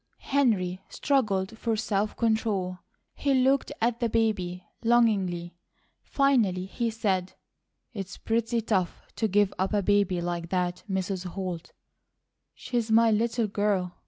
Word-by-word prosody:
Henry 195 -10 +2
struggled 215 -8 0
for 230 -2 0
self 210 -1 -1
control. 210 -5 0 0.3
He 280 -1 +1
looked 265 +1 +2
at 235 +1 +1
the 235 -2 +1
baby 185 -6 0 0.2
longingly. 200 -7 +2 0.5
Finally 230 -10 +2
he 230 +4 -2
said: 195 -5 -1 0.6
"It's 195 -4 -6
pretty 230 +1 0
tough 190 -5 -1
to 220 - +1
give 205 -1 +2
up 190 +3 0
a 205 -1 +2
baby 200 -2 +2
like 170 -1 -3
that, 180 -1 -1
Mrs. 190 -1 -2
Holt. 180 -2 -5 0.8
She's 235 -2 -2
my 225 +1 +5
little 230 +2 +1
girl. 200 -3 0
205 Hz, 130 wpm, -27 LUFS, 185-230 Hz, 0.8 s, my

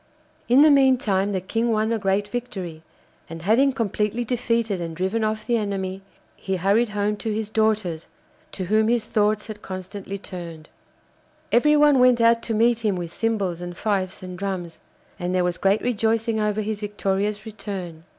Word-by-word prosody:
In 260 +4 +7
the 305 - +7
meantime 245 -8 +3
the 190 - 0
King 225 +5 -1
won 220 0 +1
a 230 - 0
great 195 +1 0
victory, 200 -8 -5 0.5
and 165 0 -8
having 240 +8 +4
completely 225 -1 -1
defeated 230 -5 -1
and 165 -1 -5
driven 190 +6 -1
off 215 0 -1
the 240 -1 +1
enemy, 195 -3 -3 0.3
he 190 -1 -3
hurried 200 +6 +2
home 210 0 -1
to 220 +1 -3
his 215 0 -3
daughters, 215 -7 0 0.5
to 190 - -4
whom 215 +3 +2
his 235 -1 +2
thoughts 215 -1 +1
had 215 -2 -8
constantly 190 +1 -6
turned. 170 -5 -9 0.8
Everyone 295 +2 +5
went 250 -1 +5
out 230 0 +4
to 225 - -3
meet 230 +1 +3
him 210 -3 +1
with 170 -2 -5
cymbals 200 -7 -1
and 175 -1 -7
fifes 190 -3 -2
and 180 -1 -7
drums, 185 -4 -4 0.4
and 180 +1 -2
there 180 - +2
was 175 -1 -1
great 195 +2 +2
rejoicing 225 -1 +1
over 210 0 0
his 215 0 -3
victorious 205 0 -2
return. 195 -6 -7
210 Hz, 170 wpm, -23 LUFS, 190-225 Hz, 0.8 s, In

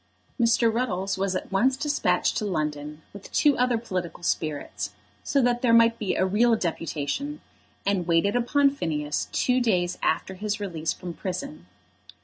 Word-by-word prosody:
Mr. 230 -1 +3
Ruddles 195 -5 -1
was 190 0 -1
at 185 - -4
once 255 +7 +2
despatched 295 +1 +1
to - - -1
London 150 -4 -3
with 200 -1 -11
two 290 -2 +4
other 250 -1 +3
political 185 -6 -5
spirits, 155 -3 -2 0.3
so 275 -2 +2
that 240 0 +2
there 230 -2 +4
might 230 0 +5
be 210 - -1
a 185 - +2
real 225 +5 +3
deputation, 170 - -3 0.5
and 195 -4 0
waited 170 +6 +2
upon 280 +4 +3
Phineas 150 - -2
two 255 0 +2
days 180 -6 +1
after 190 - 0
his 205 +2 -3
release 165 -6 -2
from 175 -1 -6
prison. 125 - -6
195 Hz, 155 wpm, -26 LUFS, 170-240 Hz, 0.5 s, might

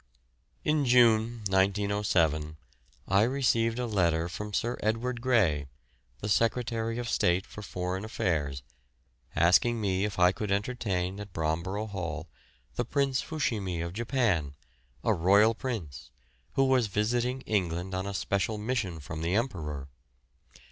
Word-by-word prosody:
In 150 -1 +2
June, 120 -2 +4
1907, 95 -6 +1 0.5
I 100 +1 +4
received 115 -2 +2
a 125 - -1
letter 85 -7 +1
from 105 +4 -6
Sir 120 +4 -1
Edward 120 +3 -1
Grey, 95 - +2 0.5
the 105 - -3
Secretary 115 +1 0
of 120 -1 -3
State 90 -4 +2
for 105 - -10
Foreign 90 -1 -3
Affairs, 75 - -1 0.7
asking 115 +7 +4
me 95 -2 0
if 105 -2 -2
I 90 0 +5
could 105 +1 -4
entertain 100 -3 -1
at 100 -3 -8
Bromborough 85 +7 -1
Hall 85 -4 -4 0.5
the - - +1
Prince 140 -2 0
Fushimi 105 - -2
of 85 +1 -4
Japan, 110 - 0 0.5
a 110 - +3
royal 100 +5 +5
prince, 90 - -5 0.4
who 135 - +3
was 130 -3 +3
visiting 120 +6 0
England 90 -4 -1
on 95 +1 -2
a 100 - -4
special 100 +3 -1
mission 105 -6 -2
from 80 +2 -6
the 85 +3 0
Emperor. 80 - -2
100 Hz, 135 wpm, -29 LUFS, 90-115 Hz, 0.7 s, I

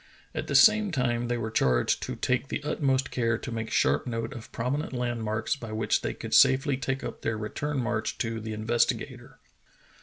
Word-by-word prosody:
At - - -4
the - - -2
same 215 -1 +6
time 120 -5 0
they 120 0 0
were 110 -1 -3
charged 65 - +2
to - - -4
take 130 +1 0
the 150 - -4
utmost 135 -3 0
care 115 -2 +1
to 120 - -7
make 115 -1 -4
sharp 70 - +2
note 115 +2 -3
of 115 -4 -10
prominent 135 +6 -2
landmarks 115 -3 -1
by 115 -6 -8
which 110 0 +1
they - - -3
could - - -6
safely 135 +1 +5
take 135 +1 -3
up - - -6
their 115 -1 -1
return 140 +7 -3
march 120 -3 -1
to 115 -1 -2
the 110 0 -6
Investigator. 110 +2 -1
120 Hz, 190 wpm, -27 LUFS, 110-135 Hz, -, same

